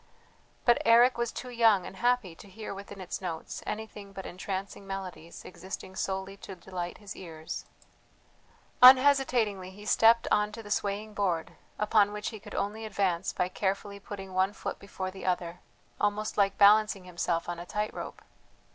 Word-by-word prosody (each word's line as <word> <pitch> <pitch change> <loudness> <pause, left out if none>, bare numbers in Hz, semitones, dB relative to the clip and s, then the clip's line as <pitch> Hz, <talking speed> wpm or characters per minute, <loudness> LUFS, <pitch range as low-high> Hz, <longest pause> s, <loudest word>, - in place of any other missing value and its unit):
But 240 -1 +5
Eric 240 +2 +6
was 235 -1 0
too 250 - -7
young 225 -6 +4
and 190 - -9
happy 245 -7 +1
to 195 - -14
hear 215 +2 -7
within 200 0 -9
its 185 +1 -5
notes 165 -4 -5
anything 210 -2 -6
but 190 -1 -7
entrancing 195 +2 -5
melodies 185 -4 -7
existing 185 +1 -8
solely 190 +1 -3
to 195 - -9
delight 175 -1 -6
his 205 -3 -9
ears. 160 -3 -7 1.2
Unhesitatingly 250 -7 +6
he 205 +2 -12
stepped 230 +2 +5
on 210 0 +3
to 225 - -8
the 205 - -10
swaying 210 +1 -1
board, 180 -6 -1 0.2
upon 210 -1 +3
which 210 0 -3
he 220 - -8
could - - -10
only 210 +2 -2
advance 190 -4 0
by 180 - 0
carefully 200 +2 -2
putting 195 -2 -8
one 190 +2 +2
foot - - -5
before 190 -1 -5
the 190 - -10
other, 175 -1 -1 0.4
almost 210 +1 0
like 195 -1 +2
balancing 205 -1 +5
himself 175 -1 -2
on 175 -1 -4
a 175 - -7
tight 210 0 -2
rope. - - -7
200 Hz, 165 wpm, -29 LUFS, 185-215 Hz, 1.2 s, Eric